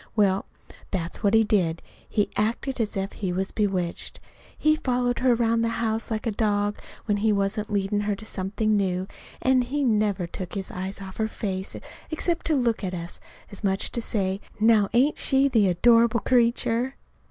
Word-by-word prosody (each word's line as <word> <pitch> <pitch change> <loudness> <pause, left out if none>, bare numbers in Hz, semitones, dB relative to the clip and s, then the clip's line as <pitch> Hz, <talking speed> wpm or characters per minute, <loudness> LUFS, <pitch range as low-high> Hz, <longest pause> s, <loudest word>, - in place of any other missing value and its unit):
Well, 195 -3 +2 0.4
that's 170 -3 -3
what 205 +1 +3
he 225 - +6
did. 180 -6 +1 0.3
He 210 - 0
acted 235 +4 -1
as 215 -1 -2
if 195 +1 -3
he 190 -4 -3
was 190 +2 -2
bewitched. 190 -5 -2 0.4
He 310 0 +3
followed 245 -4 0
her 255 -1 +4
around 230 -1 +2
the 230 - +1
house 225 -1 -1
like 220 -2 -3
a 225 - +1
dog 205 -1 0 0.3
when 210 -2 +1
he 215 +1 +2
wasn't 205 +1 -1
leadin' 200 0 0
her 205 -1 0
to 215 - -11
something 210 +2 -1
new; 185 -2 0 0.4
an' 260 0 +4
he 275 +4 -1
never 210 -6 +1
took 180 +2 -7
his 195 -1 -4
eyes 190 +2 -5
off 190 -1 -9
her 220 - +1
face 190 -3 -4 0.3
except 335 +1 -1
to 315 - +2
look 235 -5 +1
at 185 -1 -2
us, 170 0 -5 0.3
as 200 - -8
much 195 -1 +1
as - - 0
to 235 - -2
say: 195 -3 -1 0.2
'Now 215 -2 +4
ain't 265 +6 +3
she 270 0 +3
the 225 -7 +3
adorable 230 +5 +4
creature?'" 240 +1 +2
215 Hz, 185 wpm, -25 LUFS, 195-235 Hz, 0.4 s, he